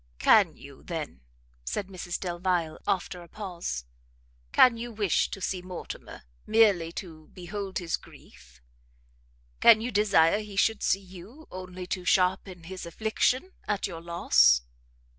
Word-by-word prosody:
"Can - - +4
you, - - -13
then," 65 - -6 0.4
said 200 - -3
Mrs 180 -2 -5
Delvile, 175 -3 -1
after 185 -1 -1
a 170 - -13
pause, 175 - -5 0.7
"can 250 - +6
you 235 +1 -6
wish 205 -5 +1
to - - -6
see 185 -1 -2
Mortimer 180 - -8 0.2
merely 205 -7 +4
to 160 -5 -9
behold 190 +2 -5
his 170 -2 -1
grief? - - -18 1.0
Can 225 -2 +8
you 240 +3 -3
desire 200 -4 +4
he 210 -2 -8
should 220 +2 +2
see 195 - +2
you, 190 - -13
only 185 0 -7
to 180 0 -4
sharpen 180 -1 +1
his 185 0 -7
affliction 220 - 0 0.2
at 205 -1 0
your 165 -4 -6
loss?" 65 - +4
185 Hz, 140 wpm, -28 LUFS, 170-205 Hz, 1.0 s, Can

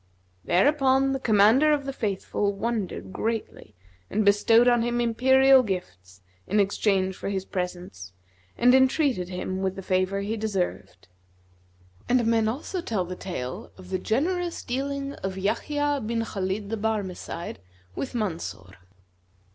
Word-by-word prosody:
Thereupon 270 - +3
the 270 - -1
Commander 225 +6 +4
of 290 -2 +1
the 275 - -4
Faithful 205 -2 -2
wondered 195 - -3
greatly 225 0 -4 0.3
and 215 0 0
bestowed 225 +4 +5
on 240 -1 +4
him 240 +1 0
imperial 265 +3 +5
gifts, 95 - -6 0.3
in 210 - +1
exchange 195 -1 +1
for - - -5
his 190 -1 -2
presents, 180 - -5 0.5
and 250 +1 +5
entreated 260 - +2
him 185 +1 -4
with 190 0 -1
the 195 - -7
favour 185 +1 0
he 210 +3 -2
deserved. 205 - -3 1.0
And 245 -1 +3
men 225 -1 +2
also 290 - -3
tell 210 - -2
the 180 +1 -6
tale 130 -10 -6
of 185 0 -13
the 185 - 0
GENEROUS 340 - -1
DEALING 275 +2 -3
OF 190 0 -4
YAHYA 290 +8 -1
BIN 230 +1 -1
KHALID 200 0 -3
THE 225 - -1
BARMECIDE 200 - -4 0.4
WITH 260 - -5
MANSUR. 165 - -4
215 Hz, 140 wpm, -26 LUFS, 185-255 Hz, 1.0 s, bestowed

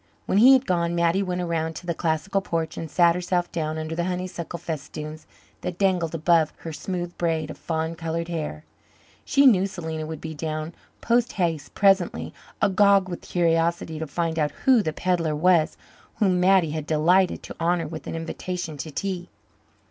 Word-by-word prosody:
When 195 - +2
he 255 +4 +9
had 265 0 +4
gone 170 -3 0
Mattie 170 +3 +2
went 180 -2 -2
around 165 -2 -2
to 175 - -8
the 170 - -1
classical 165 +4 -1
porch 165 -3 -2
and 165 - -5
sat 170 +2 +4
herself 175 0 -1
down 155 -1 -2
under 155 0 -4
the 170 +1 -1
honeysuckle 180 -2 -4
festoons 155 -1 -6 0.3
that 175 - -4
dangled 180 -4 +1
above 165 -1 +3
her 165 - -6
smooth 175 +1 -4
braids 160 -3 0
of - - -10
fawn 160 0 -2
coloured 165 0 -3
hair. 155 - -4 0.6
She 280 0 +3
knew 200 -7 +6
Selena 160 -5 -5
would 160 -1 -6
be 160 -1 -6
down 155 +1 -4 0.3
posthaste 205 - 0
presently, 195 -3 +2 0.3
agog 200 -1 +4
with 175 - -5
curiosity 165 -2 0
to 160 - -4
find 165 +2 -2
out 150 -1 +2 0.2
who 260 -4 +6
the 160 - -1
pedlar 165 -2 0
was 165 0 +3 0.4
whom 185 -4 +2
Mattie 180 -3 +4
had 155 0 -4
delighted 175 +4 +3
to - - -8
honour 170 -1 +1
with 160 0 -8
an - - -4
invitation 165 -1 -4
to 155 - -5
tea. 180 +3 -4
170 Hz, 175 wpm, -24 LUFS, 160-185 Hz, 0.6 s, he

